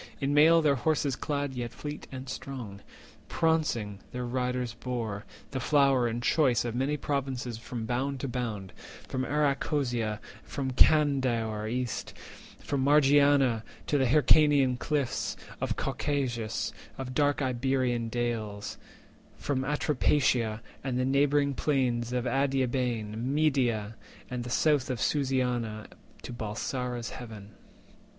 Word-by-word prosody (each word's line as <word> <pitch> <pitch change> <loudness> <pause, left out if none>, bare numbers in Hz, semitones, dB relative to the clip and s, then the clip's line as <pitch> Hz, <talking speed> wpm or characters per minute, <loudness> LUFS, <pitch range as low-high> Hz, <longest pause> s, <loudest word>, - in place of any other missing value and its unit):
In 140 0 0
mail 160 +3 +6
their 140 -3 +3
horses 145 0 +1
clad, 145 -1 -2
yet 120 -2 -4
fleet 150 +3 -7
and 130 0 -7
strong, 120 -8 -6 0.5
Prauncing 150 -11 0
their 125 0 -4
riders 125 -1 -1
bore, 115 -4 -4 0.3
the 135 - -2
flower 135 -2 +3
and 120 +1 -3
choice 130 -7 +3
Of 120 - -2
many 135 +5 0
provinces 130 -5 -3
from 115 -1 -5
bound 130 +4 -1
to - - -2
bound— 115 -6 -4 0.3
From 130 0 -2
Arachosia, 140 -6 0 0.2
from 135 -2 -3
Candaor 125 -7 +3
east, 125 -1 -3 0.5
And 140 -2 0
Margiana, 140 -4 +5 0.2
to 145 - +1
the 130 - +3
Hyrcanian 145 -1 +5
cliffs 145 -5 -1 0.2
Of - - -1
Caucasus, 125 -6 -2 0.2
and 130 -1 -5
dark 145 +1 +2
Iberian 125 -2 0
dales; 110 -4 -3 0.6
From 130 -2 -1
Atropatia, 130 -5 +1 0.2
and 130 -2 -1
the 125 - +1
neighbouring 140 +1 +3
plains 125 -4 0
Of 125 0 -1
Adiabene, 125 -4 0
Media, 130 -7 +1 0.4
and 125 -1 -3
the 125 - -6
south 145 +1 +3
320 130 - -1
Of 120 - -6 0.8
Susiana, 110 - -11 0.4
to - - -6
Balsara's 120 +2 -3
haven. 110 -4 -9
130 Hz, 125 wpm, -29 LUFS, 120-140 Hz, 0.8 s, mail